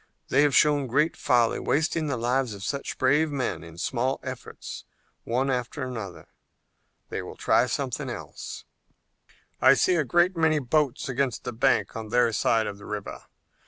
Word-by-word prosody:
They 135 Hz, -, +4 dB
have 145 Hz, -2 st, +3 dB
shown 145 Hz, -3 st, +4 dB, 0.2 s
folly, 120 Hz, -2 st, +2 dB
wasting 155 Hz, +1 st, 0 dB
the 140 Hz, -3 st, -1 dB
lives 120 Hz, -1 st, 0 dB
of 100 Hz, -, -9 dB
such 140 Hz, +7 st, -3 dB
brave 145 Hz, +4 st, +3 dB
men 135 Hz, -9 st, -2 dB
in 85 Hz, 0 st, -12 dB
small 130 Hz, +7 st, -1 dB
efforts 130 Hz, -2 st, -7 dB, 0.4 s
one 130 Hz, +4 st, 0 dB
after 125 Hz, +3 st, -3 dB
another. 110 Hz, -8 st, -6 dB, 0.8 s
They -, -, -3 dB
will -, -, -9 dB
try -, -, +3 dB
something -, -, -3 dB
else." -, -, -7 dB, 1.0 s
"I -, -, +7 dB
see 185 Hz, -, +3 dB
a 155 Hz, -, +2 dB
great 175 Hz, +6 st, +2 dB
many 160 Hz, -1 st, +3 dB
boats 140 Hz, 0 st, 0 dB
against 130 Hz, -2 st, -1 dB
the 125 Hz, -, -4 dB
bank 110 Hz, -3 st, +1 dB
on 110 Hz, -1 st, -6 dB
their 120 Hz, 0 st, +3 dB
side 110 Hz, +1 st, +2 dB
of 100 Hz, -1 st, -6 dB
the 100 Hz, -, -12 dB
river. 105 Hz, -1 st, -6 dB
130 Hz, 160 wpm, -26 LUFS, 115-145 Hz, 1.0 s, I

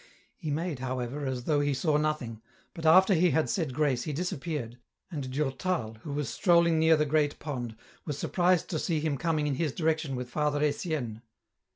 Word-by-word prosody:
He 160 Hz, -, -6 dB
made, 155 Hz, -1 st, -2 dB
however, 130 Hz, +2 st, -3 dB
as 130 Hz, -2 st, -3 dB
though 150 Hz, +2 st, +2 dB
he 145 Hz, -1 st, +1 dB
saw 155 Hz, +3 st, +1 dB
nothing, 150 Hz, -8 st, -2 dB, 0.3 s
but 165 Hz, -2 st, -3 dB
after 190 Hz, +5 st, +7 dB
he 180 Hz, +1 st, +4 dB
had 160 Hz, -1 st, +1 dB
said 160 Hz, -8 st, -1 dB
grace 135 Hz, -2 st, +1 dB
he 150 Hz, -, -3 dB
disappeared, 145 Hz, -6 st, -3 dB, 0.3 s
and 140 Hz, -6 st, -4 dB
Durtal, 135 Hz, -3 st, -1 dB
who 145 Hz, -, -7 dB
was 145 Hz, -2 st, -2 dB
strolling 170 Hz, -, +3 dB
near 160 Hz, 0 st, +5 dB
the 150 Hz, -, +2 dB
great 150 Hz, 0 st, +1 dB
pond, 125 Hz, -7 st, -5 dB, 0.3 s
was 150 Hz, -3 st, -4 dB
surprised 180 Hz, +1 st, +2 dB
to 160 Hz, -, -1 dB
see 165 Hz, -1 st, 0 dB
him 150 Hz, -1 st, 0 dB
coming 155 Hz, -1 st, 0 dB
in 145 Hz, -, 0 dB
his 150 Hz, +2 st, 0 dB
direction 155 Hz, -4 st, 0 dB
with 125 Hz, 0 st, -4 dB
Father 145 Hz, +3 st, 0 dB
Etienne. 145 Hz, -, -2 dB
150 Hz, 190 wpm, -29 LUFS, 130-160 Hz, 0.3 s, after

